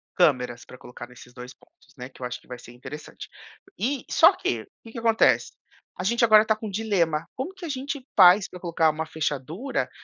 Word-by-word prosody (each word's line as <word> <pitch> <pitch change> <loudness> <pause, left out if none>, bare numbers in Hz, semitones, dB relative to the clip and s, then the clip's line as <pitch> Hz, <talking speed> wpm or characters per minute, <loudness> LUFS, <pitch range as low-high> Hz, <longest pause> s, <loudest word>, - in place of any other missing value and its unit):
câmeras 125 -8 +1
pra 125 - -13
colocar 120 -1 -11
nesses 125 0 -15
2 125 0 -10
pontos, - - -27
né, 125 +1 -8
que 130 - -19
eu - - -3
acho 125 0 -5
que - - -25
vai 125 - -8
ser 120 - -13
interessante. 135 +5 -10 0.5
E 260 +3 -1
só - - +6
que - - -3 0.2
que 225 - -12
que - - -8
acontece? 225 -1 +2 0.5
A - - -3
gente 235 +5 +1
agora 215 -1 +6
tá 220 - +2
com 215 0 -7
um - - -6
dilema: 175 -7 0
como 305 +9 -5
que 365 -2 -10
a - - -6
gente 275 -1 -5
faz 185 +1 +7
pra 180 - -11
colocar 170 -2 +1
uma 160 +1 -4
fechadura 160 - -3
175 Hz, 215 wpm, -25 LUFS, -, 0.5 s, faz